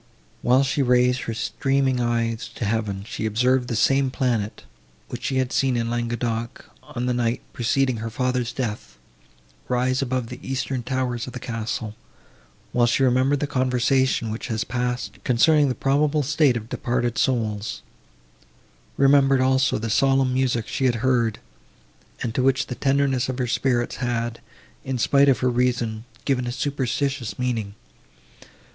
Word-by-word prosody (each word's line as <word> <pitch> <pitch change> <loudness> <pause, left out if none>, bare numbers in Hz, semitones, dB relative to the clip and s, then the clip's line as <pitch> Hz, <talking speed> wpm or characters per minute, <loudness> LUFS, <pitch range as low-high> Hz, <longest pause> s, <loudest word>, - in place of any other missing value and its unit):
While 125 +3 +4
she 140 +1 0
raised 125 0 +3
her 115 - -3
streaming 135 +2 0
eyes 115 -1 -1
to 115 - -3
heaven, 105 -2 -1
she 110 - -3
observed 125 +4 +2
the 120 - -2
same 135 +4 +3
planet, 120 -6 -1 0.5
which - - -6
she 130 - 0
had 130 -1 0
seen 130 -3 +1
in 115 0 -1
Languedoc, 120 -1 -3 0.2
on 120 +1 -5
the 125 - +1
night, 120 0 -1
preceding 130 0 +1
her 115 +1 -4
father's 125 0 -1
death, 115 - -5 0.7
rise 130 +1 +1
above 130 -3 -2
the - - -8
eastern 135 -1 -3
towers 125 -1 -2
of 125 - -8
the 125 - -5
castle, 115 -3 -4 0.8
while 120 -1 +3
she 120 +3 +2
remembered 130 +2 +2
the - - +1
conversation, 130 -3 +1
which 110 - -5
has 110 -3 -1
passed, 125 0 -3
concerning 145 +4 +4
the 125 - -1
probable 145 +2 +1
state 145 -3 +2
of 110 -1 -7
departed 120 -1 -1
souls; 110 -5 -1 1.1
remembered, 135 -1 +5
also, 130 0 +2
the 115 0 -3
solemn 135 +1 +3
music 125 -3 0
she 135 - -1
had 125 -2 +3
heard, 120 -4 +2 0.9
and 115 - -2
to 130 - 0
which 135 +1 +2
the 125 - -5
tenderness 135 -1 +1
of 130 - -3
her 125 - 0
spirits 120 0 0
had, 120 -2 -2 0.4
in 135 -3 -2
spite 140 +4 +4
of 135 - +2
her 125 - +3
reason, 120 -2 0 0.2
given 125 -3 0
a - - -2
superstitious 135 -1 -2
meaning. 115 -5 -2
125 Hz, 155 wpm, -23 LUFS, 115-135 Hz, 1.1 s, remembered